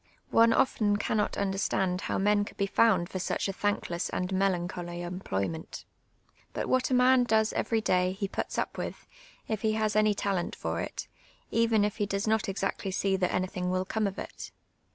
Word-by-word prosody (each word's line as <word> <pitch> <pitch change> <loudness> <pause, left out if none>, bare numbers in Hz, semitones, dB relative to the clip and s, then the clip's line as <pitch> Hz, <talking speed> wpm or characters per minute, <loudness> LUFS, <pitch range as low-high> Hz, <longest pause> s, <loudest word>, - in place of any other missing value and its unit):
One 230 0 +6
often 210 -4 +2
cannot 210 0 0
understand 190 -2 0
how - - -2
men 205 +1 +3
coidd - - -10
be 200 - +1
found 200 -3 +3
for 185 - -5
such 180 - -1
a 195 - -2
thankless 190 -3 -1
and 180 +1 -2
melancholy 175 -2 -1
em])loT^'ment. 165 - -4 0.7
But - - -3
what 255 0 +2
a 255 - +2
man 250 0 +5
does 220 -2 +2
every 225 -1 0
day 180 -2 +2
he 200 +1 -3
puts - - -4
up - - -2
with, - - -5 0.4
if 215 -3 -2
he 215 0 +1
lias 215 -1 0
any 215 -1 +4
talent 195 -3 -1
for - - -3
it, - - -5 0.4
even 225 -2 +3
if 210 - -3
he 205 -2 0
does 200 +1 -1
not 220 -2 +1
exactly 195 0 -2
see 195 +1 +1
that 180 -1 0
anything 185 0 -1
will 185 0 0
come 215 +2 0
of 195 - -5
it. - - -7
200 Hz, 190 wpm, -29 LUFS, 185-215 Hz, 0.7 s, One